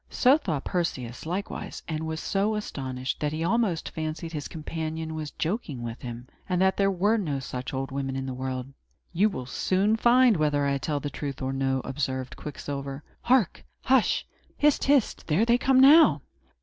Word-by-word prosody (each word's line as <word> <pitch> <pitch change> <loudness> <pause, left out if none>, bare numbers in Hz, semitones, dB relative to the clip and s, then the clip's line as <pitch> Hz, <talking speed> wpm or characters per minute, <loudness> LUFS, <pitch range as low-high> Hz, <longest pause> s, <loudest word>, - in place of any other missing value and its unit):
So 260 +2 +5
thought 165 - -2
Perseus, 130 -8 -3
likewise, 185 +4 -4
and 160 0 -3
was 160 0 -3
so 205 +4 0
astonished 130 -10 -4
that 150 -1 -1
he 160 +1 -2
almost 190 -3 +1
fancied 160 +1 -4
his 150 -2 -4
companion 160 0 -5
was 155 -1 -4
joking 155 - -3
with 115 0 -6
him, 120 0 -7 0.2
and 180 -1 +1
that 190 0 +3
there 195 -1 +2
were 200 +4 +2
no 155 -10 -1
such 130 -1 -5
old 135 0 -3
women 135 -1 -3
in 135 0 -3
the 130 - -4
world. 130 +1 -4 0.4
"You 200 +5 +3
will 130 -11 -5
soon 190 - +1
find 240 -1 +5
whether 145 -2 +1
I 140 0 +1
tell 145 +1 -1
the 145 0 -5
truth 140 0 -5
or 130 0 -2
no," 135 -1 0
observed 130 -2 -3
Quicksilver. 140 -1 -6 0.2
"Hark! 240 -7 +2 0.2
hush! 260 -2 +3 0.3
hist! 295 -1 +3
hist! 275 -4 +2
There 170 +8 +3
they 240 +1 +3
come, 265 0 +4
now!" 300 +5 +7
155 Hz, 180 wpm, -27 LUFS, 135-200 Hz, 0.4 s, now